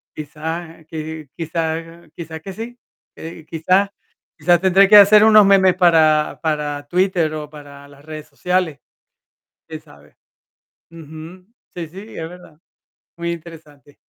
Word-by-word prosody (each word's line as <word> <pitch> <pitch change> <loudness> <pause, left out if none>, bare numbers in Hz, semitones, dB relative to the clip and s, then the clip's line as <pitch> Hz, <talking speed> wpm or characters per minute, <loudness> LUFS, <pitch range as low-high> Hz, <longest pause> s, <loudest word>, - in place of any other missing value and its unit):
Quizá, 160 +3 -6
eh, 160 - -21
qui 155 -1 -7
quizá 165 +1 -4
quizá 160 -1 -8
que 190 +4 -9
sí, 240 +4 -8 0.4
eh, 160 -1 -10
quizá 185 +5 +1 0.5
quizá 175 -1 +3
tendré 190 +2 +4
que 210 - +6
hacer 210 +1 +8
unos 215 -2 +7
memes 190 -2 +4
para 160 -4 +3
para 150 -2 -3
Twitter, 180 -2 0
o 150 -1 -6
para 145 -2 -13
las 140 0 -18
redes 155 -1 -9
sociales, 180 -5 -2 0.9
quién - - -8
sabe. - - -20 0.7
Ujú. 165 +3 -12 0.3
Sí, 175 -2 -5
sí, 185 +5 -11 0.2
es 160 0 -5
verdad, 175 -3 -15 0.6
muy 170 0 -3
interesante. 155 -4 -14
165 Hz, 135 wpm, -19 LUFS, 155-180 Hz, 0.9 s, hacer